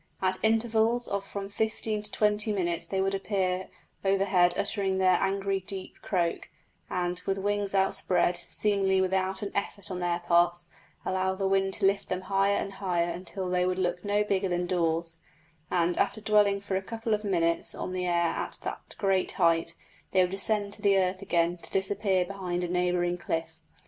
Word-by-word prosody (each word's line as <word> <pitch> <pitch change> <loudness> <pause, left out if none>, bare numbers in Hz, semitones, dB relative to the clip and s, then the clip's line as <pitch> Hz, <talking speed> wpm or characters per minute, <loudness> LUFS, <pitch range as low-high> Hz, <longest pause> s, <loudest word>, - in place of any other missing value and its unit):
At 185 0 0
intervals 225 +1 +2
of 200 0 -2
from 200 0 -6
fifteen 220 +1 -2
to 210 - -3
twenty 210 0 +2
minutes 175 -4 -1
they 190 -1 -1
would 195 0 0
appear 190 -2 -1 0.3
overhead 195 -2 +3
uttering 195 -2 0
their 185 -1 +4
angry, 195 0 0
deep 190 0 -4
croak, 175 -3 -1 0.4
and, 180 0 -2
with 195 0 +1
wings 205 0 0
outspread, 185 -2 +3
seemingly 190 +2 0
without 190 +1 0
an 200 - -4
effort 200 -1 -3
on 180 - -3
their 175 -1 0
parts 175 0 +2 0.4
allow 190 0 0
the 195 0 -1
wind 195 0 +1
to - - 0
lift 195 +1 +1
them 185 0 -2
higher 195 +1 +2
and 195 - -3
higher 180 -3 -1
until 185 +2 -5
they 180 0 +1
would 185 0 0
look 180 -1 -1
no 205 +1 +2
bigger 195 -2 0
than 175 0 0
daws; 165 -2 0 0.5
and, 175 0 +1
after - - +1
dwelling 210 -2 +3
for 195 -1 -3
a 190 - 0
couple 225 +2 -3
of 210 0 -1
minutes 170 -4 0
on 185 - -4
the 180 -1 -1
air 170 -1 +2
at - - -4
that - - -6
great 195 -2 +1
height, 165 -1 +2 0.4
they 190 - +5
would 180 0 +1
descend 200 +1 0
to - - -8
the 200 -1 +4
earth 185 0 0
again, 175 -2 +1
to - - -9
disappear 195 -1 +1
behind 180 -2 -3
a - - -1
neighbouring 180 0 0
cliff. 165 -1 -3
190 Hz, 185 wpm, -28 LUFS, 180-200 Hz, 0.5 s, they